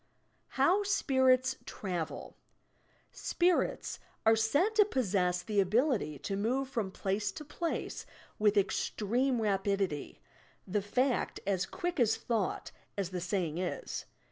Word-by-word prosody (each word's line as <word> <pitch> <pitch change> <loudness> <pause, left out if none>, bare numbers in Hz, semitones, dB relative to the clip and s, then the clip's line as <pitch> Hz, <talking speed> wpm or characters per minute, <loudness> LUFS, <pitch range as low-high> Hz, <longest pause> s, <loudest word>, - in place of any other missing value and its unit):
HOW 345 +10 +4
spmrrs 260 -10 +3
travel 175 -5 -5 0.8
"Spirits" 350 0 0 0.3
are 225 0 +7
said 285 - +2
to 435 -1 +7
possess 190 - 0
the 210 +1 0
ability 200 - +2
to 145 +8 -3
move 250 +7 0
from 230 -7 -2
place 195 +2 -1
to 300 - -8
place 335 +3 -3 0.3
with 210 0 +4
estrcme 230 +5 +1
rapidity, 195 -6 -1 0.2
— - - -33
the 205 - +3
fact, 250 +6 0
"as 190 -1 0
quick 350 - -3
as 225 -3 +3
thought," 225 -5 -2 0.3
as 190 -2 -2
the 180 -1 -3
saying 175 -3 -1
is. 485 - -3
215 Hz, 125 wpm, -32 LUFS, 190-265 Hz, 0.8 s, are